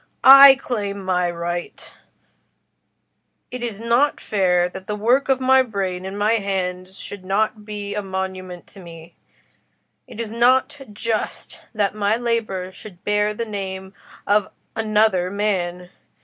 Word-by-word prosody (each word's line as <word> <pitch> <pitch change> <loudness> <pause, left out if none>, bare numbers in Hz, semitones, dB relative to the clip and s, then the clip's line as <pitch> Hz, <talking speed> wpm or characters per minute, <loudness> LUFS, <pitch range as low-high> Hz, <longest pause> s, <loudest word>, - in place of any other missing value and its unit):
I 275 0 +10
claim 205 -7 -4
my 180 -1 +1
right: 175 0 -5 1.6
it 250 - -6
is 230 -4 -5
not 235 +6 +1
fair 180 -4 +1
that 190 +1 -10
the 210 - -2
work 245 +7 +1
of 265 -1 +3
my 260 0 +4
brain 190 -6 -3
and 195 +1 -6
my 215 +3 +2
hands 185 -1 -4
should 205 -2 -9
not 210 +2 -1
be 205 -1 -6
a 210 - -2
monument 190 -2 -6
to 200 - -15
me—it 170 +5 -17
is 225 -2 -4
not 260 +5 +2
just 220 +1 -4 0.2
that 205 -2 0
my 210 0 +1
labour 225 -6 -2
should 185 -1 -13
bear 210 0 0
the 230 - -3
name 190 -2 -6 0.3
of 205 0 +2 0.3
another 215 -4 +1
man. 180 -3 -2
205 Hz, 135 wpm, -21 LUFS, 185-225 Hz, 1.6 s, I